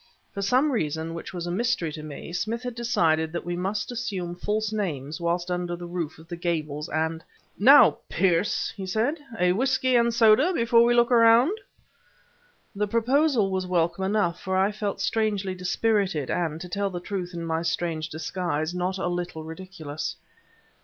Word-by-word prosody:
For 200 - -4
some 255 +9 +2
reason 160 - -2
which 170 - -7
was 175 -2 -5
a 175 - -3
mystery 215 -4 0
to 155 - -7
me, 155 +2 -8
Smith 225 +6 -2
had 250 -1 -4
decided 165 -10 +1
that 170 - -4
we 175 0 -2
must 200 +6 -2
assume 195 -8 -3
false 215 +3 -2
names 160 -7 -3
whilst 175 +1 -1
under 175 -1 -2
the 175 0 -8
roof 170 -3 -4
of 160 +1 -15
the 170 - -5
Gables; 155 -4 -3
and: 160 +1 -2 0.4
"Now, - - +7
Pearce," 180 +1 +1
he 195 -3 -6
said, 235 - 0 0.2
"a 180 0 +4
whisky 260 +4 +1
and 235 0 +4
soda 235 +9 +5
before 230 -4 +4
we 240 0 +3
look 240 +1 +3
around?" 235 - +5 1.2
The 210 +1 0
proposal 235 -1 +2
was 185 -1 -1
welcome 170 +1 0
enough, 195 -3 0
for 190 -1 -1
I 195 +2 +3
felt 205 -1 -3
strangely 210 -4 0
dispirited, 185 - 0
and, 160 -3 -1
to 180 - -6
tell 200 +2 -1
the 180 -2 -5
truth, 180 -1 -5
in 170 -1 -4
my 165 0 -1
strange 165 -1 -2
disguise, 160 0 -3
not 180 +1 -2
a 190 - -3
little 175 -2 -3
ridiculous. 160 -2 -6
185 Hz, 175 wpm, -26 LUFS, 170-220 Hz, 1.2 s, Now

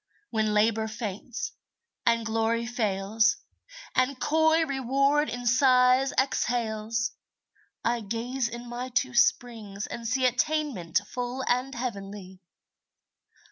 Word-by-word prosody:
When 215 -2 +1
Labor 220 +1 +2
faints, 220 - -5 0.6
and 230 -1 +3
Glory 225 +1 0
fails, 220 -1 +1 0.6
And 255 +1 +1
coy 320 +2 +3
Reward 275 +2 +1
in 245 0 -5
sighs 255 +1 +4
exhales, 230 -3 0 0.7
I 235 +1 +2
gaze 235 +4 -2
in 240 +1 -8
my 245 +2 -5
two 255 +1 0
springs 230 -5 +1
and 235 -1 -6
see 255 +2 +1
Attainment 250 - +1
full 250 +3 -4
and 250 +2 0
heavenly. 200 -6 -6
240 Hz, 105 wpm, -27 LUFS, 220-260 Hz, 0.7 s, sighs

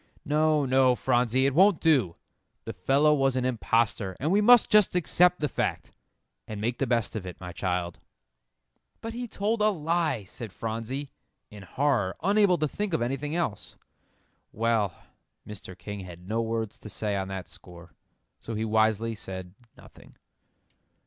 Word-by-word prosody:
"No, 155 -1 +2
no, 130 -1 +4
Phronsie, 125 +1 +1
it 140 - +2
won't 190 +2 +5
do; 130 - +2 0.5
the 115 - -5
fellow 135 +11 +3
was 135 -2 +1
an 130 -1 0
impostor, 115 -5 0
and 150 +5 0
we 205 +2 +4
must 240 +2 +6
just 210 -4 +5
accept 180 +1 +3
the 150 - 0
fact, - - -3 0.6
and 105 -1 -6
make 115 +3 -2
the 135 - 0
best 115 -2 0
of 110 - -3
it, 90 - -9
my 90 -1 -7
child." 90 -1 -3 1.0
"But 225 0 -6
he 245 +1 -5
told 215 +1 -1
a 215 - +5
lie," 165 - -1
said 105 +3 -9
Phronsie, 115 +7 -5 0.4
in 105 -1 -11
horror, 100 -1 0
unable 200 -1 +4
to 155 -1 0
think 200 +3 -2
of - - -1
anything 140 +5 -3
else. 170 -12 -3 0.8
"Well." 110 -3 +1 0.6
Mr. 95 -3 -9
King 105 -1 -7
had 90 -1 -10
no 115 +3 0
words 115 -2 -3
to 105 - -10
say 105 -1 -2
on 95 -1 -2
that 95 -1 -6
score, 85 -1 -14 0.5
so 115 - -6
he 110 +1 -2
wisely 110 +1 +1
said 95 -3 -8 0.2
nothing. - - -17
120 Hz, 160 wpm, -27 LUFS, 105-155 Hz, 1.0 s, must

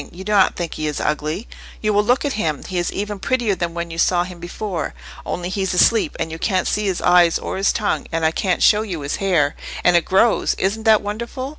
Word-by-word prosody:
You 185 +2 -9
do 210 - -4
not 200 -2 +4
think 170 -2 -4
he 155 - -3
is 150 - -3
ugly. 155 +7 -2 0.3
You 215 -1 0
will 205 +1 +3
look 245 +7 +1
at 285 - -1
him. 160 -9 -2
He 185 -2 -3
is 175 - -1
even 205 0 -4
prettier 235 0 0
than 170 -2 -3
when 170 0 -4
you 165 - -6
saw 175 +1 +3
him 180 -1 -9
before—only 175 -1 -5
he's 190 -1 -2
asleep, 225 +4 +3
and 165 -1 -2
you 160 - -6
can't 185 -2 0
see 210 - 0
his 190 -3 -1
eyes 175 -2 +5
or - - -5
his 195 +1 +2
tongue, 210 -2 -1
and 165 -1 0
I 160 - +3
can't 180 +2 0
show 210 0 +5
you 185 -8 -5
his 140 0 -3
hair—and 175 -1 0
it 170 - +3
grows—isn't 215 +1 +1
that 220 -2 +5
wonderful? 235 +5 -5
185 Hz, 230 wpm, -20 LUFS, 170-210 Hz, 0.3 s, eyes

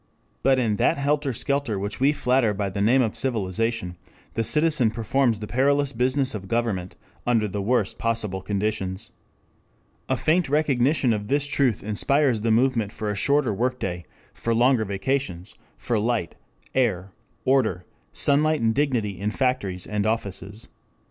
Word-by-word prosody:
But 135 -1 +3
in 110 -5 +1
that - - +2
helter 145 0 0
skelter 140 -2 -1
which 100 +2 -4
we 135 +3 +4
flatter 125 -6 +1
by 100 -1 -2
the 100 - -3
name 125 +5 +4
of 110 - -2
civilization, 115 -4 -2 0.4
the 115 - 0
citizen 150 -3 +3
performs 115 +1 0
the - - -3
perilous 140 +4 +1
business 130 +3 0
of 100 -3 -6
government 105 -5 -2 0.3
under 115 -3 +2
the 100 +1 -4
worst 110 -1 0
possible 110 -5 -1
conditions. 100 -2 -3 1.0
A 130 - +1
faint 160 +2 +1
recognition 135 -3 +2
of 105 -1 -3
this 145 +3 +1
truth 140 -6 +1
inspires 125 +3 +1
the 115 - 0
movement 115 -2 +2
for 110 -2 -3
a - - -3
shorter 140 +2 +2
work 125 +5 -1
day, 90 -5 -4 0.3
for 115 0 -1
longer 120 -1 +3
vacations, 100 -2 -2 0.2
for 115 -3 -1
light, 110 -6 -1 0.4
air, 100 -7 0 0.3
order, 130 -9 +1 0.3
sunlight 150 +2 +2
and 115 -1 +2
dignity 120 -8 0
in 100 +2 -1
factories 105 -7 -1
and 105 0 -1
offices. 105 -1 -4
115 Hz, 155 wpm, -24 LUFS, 105-135 Hz, 1.0 s, we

